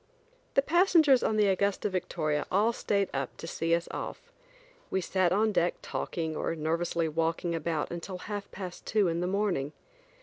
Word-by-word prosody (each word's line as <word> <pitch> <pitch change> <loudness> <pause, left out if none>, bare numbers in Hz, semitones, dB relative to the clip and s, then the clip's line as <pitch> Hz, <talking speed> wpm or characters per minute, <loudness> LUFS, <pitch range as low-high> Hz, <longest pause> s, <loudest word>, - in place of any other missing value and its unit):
The 275 - +5
passengers 325 -5 +5
on 215 - +1
the 210 - +5
Augusta 200 +1 +1
Victoria 170 -6 -1
all 210 +5 +3
stayed 200 -3 0
up 135 0 -3
to - - -7
see 165 0 +1
us 170 - -3
off. - - -6 0.6
We 190 - +1
sat 185 -1 +1
on 215 +3 +3
deck 175 -3 +2
talking 160 -2 -3
or 165 - -1
nervously 165 +1 0
walking 165 +2 -1
about 165 -1 -2
until 175 +2 -5
half 205 +2 -5
past 185 -3 -8
two 210 -3 +3
in 165 0 0
the 180 - 0
morning. 185 -8 0
180 Hz, 170 wpm, -29 LUFS, 165-205 Hz, 0.6 s, The